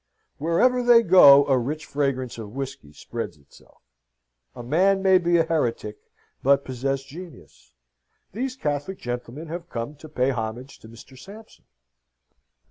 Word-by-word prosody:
Wherever 170 - +2
they 240 -1 +5
go 145 -7 +7
a 135 -2 +2
rich 150 +6 -4
fragrance 130 -4 -2
of 110 +1 -9
whisky 135 - -7
spreads 75 - -7
itself. 70 -1 -23 0.7
A 120 - -8
man 190 +9 +2
may 190 -1 +5
be 175 -1 +2
a 165 - +3
heretic, 120 -10 -2 0.4
but 140 +1 +3
possess 135 +1 -3
genius: 140 - -14 0.6
these 255 +4 -4
Catholic 150 - -3
gentlemen 125 +5 -6
have 170 +1 -7
come 115 +5 -5
to 155 - -13
pay 130 -2 0
homage 120 +2 -6
to 110 - -14
Mr. 115 +3 -15
Sampson. 205 +10 -14
140 Hz, 140 wpm, -24 LUFS, 125-175 Hz, 0.7 s, go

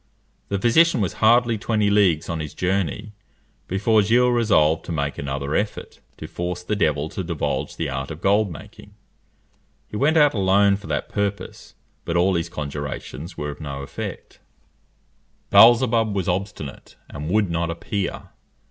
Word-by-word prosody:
The 100 - -1
physician 125 - +4
was 100 -4 -1
hardly 115 0 +4
twenty 105 -1 +1
leagues 95 -7 +3
on 85 -1 -3
his 75 -1 -6
journey, 95 +3 -2 0.6
before 105 +3 +2
Gilles 120 +4 +3
resolved 100 -10 +2
to - - -6
make 70 -3 -2
another 70 +1 -3
effort 105 +4 -3 0.2
to - - -8
force 90 0 -5
the 105 +4 -2
devil 75 -6 0
to 95 - -5
divulge 85 -3 -3
the 80 - -3
art 65 0 -4
of 80 - -7
gold 100 +2 +2
making. 80 - -12 0.9
He 105 - -6
went 155 +7 +2
out 145 -2 +5
alone 100 0 +3
for 100 - -12
that - - -2
purpose; 100 -2 -4 0.3
but 85 - -1
all 95 +2 +3
his 85 -1 -1
conjurations 75 0 -6
were 75 0 -3
of 70 - -12
no 70 -2 -6
effect. - - -8 1.1
Beelzebub 115 -2 +5
was 95 -3 -2
obstinate, 90 -6 -4
and 75 +2 -7
would 100 -1 +1
not 85 0 -1
appear. 90 +3 -4
95 Hz, 155 wpm, -22 LUFS, 80-105 Hz, 1.1 s, out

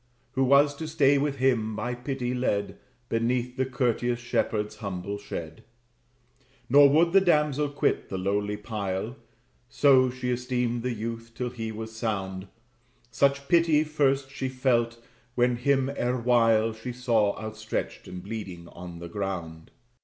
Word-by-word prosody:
Who 135 0 +1
was 140 +2 +5
to 160 - -5
stay 145 -3 +3
with 145 0 0
him, 120 -5 +1
by 120 +3 -2
pity 125 0 -3
led, 105 -5 -1 0.3
Beneath 120 +2 0
the 130 0 0
courteous 120 -2 0
shepherd's 105 -3 -1
humble 100 -1 -5
shed. 100 0 -7 1.1
Nor 140 +2 +8
would 165 +4 +3
the 195 - +7
damsel 150 -5 +2
quit 145 - 0
the 95 - -3
lowly 100 +2 -1
pile 105 +1 -4 0.5
(So 130 -3 +5
she 125 0 -3
esteemed 125 -1 -1
the 125 +1 -2
youth) 115 +1 -6
till 125 0 -3
he 115 -2 -5
was 110 0 -7
sound; 100 -4 -3 0.6
Such 140 0 +1
pity 165 -2 +4
first 140 -3 +1
she 130 -2 -3
felt, 120 -3 +1 0.4
when 125 0 +2
him 135 +1 +2
erewhile 115 -3 +2
She 110 +3 -7
saw 115 -5 +1
outstretched 110 0 -5
and 90 0 -8
bleeding 95 -5 -7
on 85 -1 -9
the 85 0 -7
ground. 85 -4 -5
120 Hz, 145 wpm, -27 LUFS, 105-135 Hz, 1.1 s, Nor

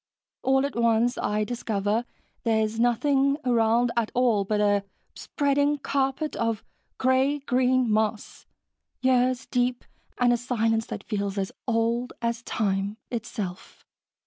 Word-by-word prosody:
All 265 +1 +2
at 280 - -4
once, 235 +1 +2
I 210 +1 0
discover 220 -1 -1 0.4
there's 220 -1 0
nothing 275 +4 +2
around 235 0 +3
at 235 -2 +1
all 240 -5 +3
but 210 +1 0
a 205 -1 +2 0.3
spreading 285 +1 0
carpet 275 +2 -1
of 230 -2 -1 0.3
gray 260 +3 +2
green 255 -2 +2
moss, 215 0 -1 0.6
years 255 -1 +2
deep, 245 0 -1 0.3
and 245 -1 +4
a - - +2
silence 225 -2 0
that - - -6
feels 200 -2 -3
as 195 -1 -2 0.2
old 235 +1 0
as 235 0 -2
time 200 -2 -1
itself. 215 -6 -6
235 Hz, 125 wpm, -26 LUFS, 220-255 Hz, 0.6 s, and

